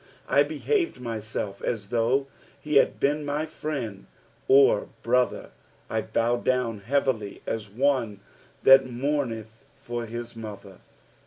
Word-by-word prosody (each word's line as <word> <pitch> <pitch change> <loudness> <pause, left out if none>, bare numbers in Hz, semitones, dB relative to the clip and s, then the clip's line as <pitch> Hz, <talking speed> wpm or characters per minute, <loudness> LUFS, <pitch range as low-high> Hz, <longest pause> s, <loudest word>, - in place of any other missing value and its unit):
14 - - +2
I - - -8
behaved 405 -6 -1
myself 110 -4 -4
as 105 -4 -3
though 120 +3 +2 0.3
he 150 -1 +1
had - - +3
been 150 +2 +1
my 145 +2 -1
friend 140 -10 -5 0.4
or 135 -6 +5
brother: 125 +1 +1 0.4
I 110 - +1
bowed 115 +2 0
down 125 -4 0
heavily 115 -2 -1
as 110 -2 -3
one 120 -3 0 0.4
that 135 0 +8
mournethyiw 120 -2 -4
his 120 +1 -6
mother. 105 -4 -9
120 Hz, 120 wpm, -26 LUFS, 110-140 Hz, 0.4 s, that